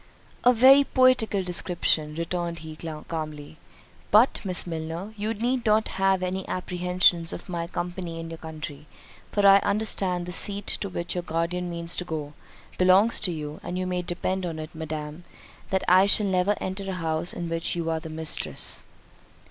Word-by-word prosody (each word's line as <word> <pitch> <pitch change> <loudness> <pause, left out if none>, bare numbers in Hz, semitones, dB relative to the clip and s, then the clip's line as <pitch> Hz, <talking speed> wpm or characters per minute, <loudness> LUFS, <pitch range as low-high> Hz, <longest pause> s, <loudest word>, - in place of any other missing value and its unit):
"A 245 - +7
very 265 +4 +7
poetical 255 -7 +3
description," 170 -4 0
returned 170 +1 -3
he 155 -1 -8
calmly. 155 -1 -6 0.5
"But, 220 +6 +4
Miss 185 -3 +2
Milner, 165 +4 -5
you 215 +1 -2
need 240 +3 -1
not 215 0 +2
have 190 -1 +1
had - - 0
any 190 +1 -4
apprehensions 180 -2 +1
of - - -7
my 170 -2 -3
company 175 -1 -5
in 165 0 -6
the 165 - -7
country, 155 -2 -8 0.4
for 205 -1 +1
I 195 0 +8
understand 195 -4 0
the 180 - -6
seat 200 +2 +1
to 200 - -3
which 170 -1 -3
your 180 - -2
guardian 175 +1 -2
means 170 0 -3
to - - -1
go, 155 -4 -5 0.5
belongs 185 +5 +4
to 185 - 0
you; 150 -2 -6
and 180 - -5
you 185 - -2
may 180 -1 -1
depend 185 +2 -2
upon 165 -3 -4
it, 155 0 -7
Madam, 155 0 -6 0.5
that 190 -1 0
I 185 +2 +6
shall 210 +1 +4
never 190 +1 +2
enter 195 +1 -4
a - - -2
house 165 -1 0
in 175 - -4
which 165 +1 -1
you 165 -1 -1
are 160 - -1
the 160 - -9
mistress." 160 0 0
180 Hz, 180 wpm, -26 LUFS, 165-195 Hz, 0.5 s, I